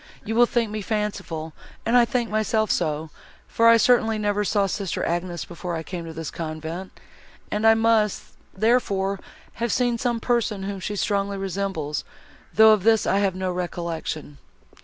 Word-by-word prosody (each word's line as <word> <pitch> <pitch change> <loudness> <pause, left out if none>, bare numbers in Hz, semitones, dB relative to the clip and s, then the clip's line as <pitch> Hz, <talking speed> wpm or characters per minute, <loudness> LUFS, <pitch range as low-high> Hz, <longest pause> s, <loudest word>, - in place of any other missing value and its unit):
You 225 - -2
will 240 +1 +5
think 230 -3 0
me 215 0 -3
fanciful, 200 -7 -3 0.3
and 230 - +2
I 245 -1 +7
think 240 0 -1
myself 215 0 +1
so, 155 -1 -1 0.4
for 230 - +3
I 230 - +8
certainly 225 -1 +3
never 210 -1 0
saw 205 0 +2
sister 195 -1 -2
Agnes, 175 -1 -2
before 175 0 -5
I 160 - -4
came 175 0 -6
to 165 - -7
this 160 -1 -5
convent, 160 +3 -5 0.6
and 210 +2 +2
I 225 - +7
must, 225 -2 +1 0.2
therefore, 200 -3 +1 0.4
have 235 -1 +1
seen 245 -1 +1
some 240 -1 0
person, 225 -5 0
whom 195 0 -4
she 205 +3 -4
strongly 200 0 -1
resembles, 190 -6 -3 0.5
though 220 +1 +7
of 210 - +1
this 225 +2 +3
I 195 - +2
have 195 -2 +1
no 185 0 -2
recollection." 170 -4 -4
200 Hz, 170 wpm, -24 LUFS, 175-225 Hz, 0.6 s, I